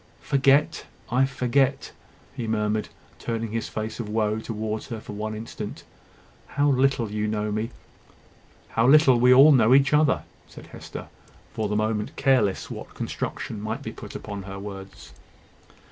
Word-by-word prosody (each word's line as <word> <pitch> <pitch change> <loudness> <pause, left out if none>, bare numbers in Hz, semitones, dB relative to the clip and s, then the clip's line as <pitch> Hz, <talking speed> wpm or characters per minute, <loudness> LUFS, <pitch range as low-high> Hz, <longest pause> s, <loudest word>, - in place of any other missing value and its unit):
"Forget! 140 +2 +2 0.3
I 130 +2 +4
forget!" 135 +1 0 0.4
he 115 - -4
murmured, 105 -1 -1 0.3
turning 115 -2 -3
his 115 0 -3
face 110 +2 -5
of 110 -3 -4
woe 110 0 0
towards 110 -1 -4
her 115 -2 -5
for 105 - -9
one 110 +1 -4
instant. 110 -1 -7 0.6
"How 145 +1 +1
little 130 -4 +2
you 105 0 -1
know 105 0 -2
me!" 110 +2 -2 1.0
"How 115 +2 +2
little 135 -3 +6
we 125 +1 +5
all 135 +4 +8
know 125 -2 +5
each 135 0 +4
other!" 150 -1 +3 0.2
said - - -13
Hester, - - -9 0.5
for 110 -3 -2
the 105 - -1
moment 110 0 -1
careless 130 -8 +1
what - - -8
construction 105 - -4
might 110 +2 -4
be - - -5
put - - -10
upon 100 -2 -6
her 95 0 -8
words. 95 -9 -9
110 Hz, 155 wpm, -25 LUFS, 105-130 Hz, 1.0 s, all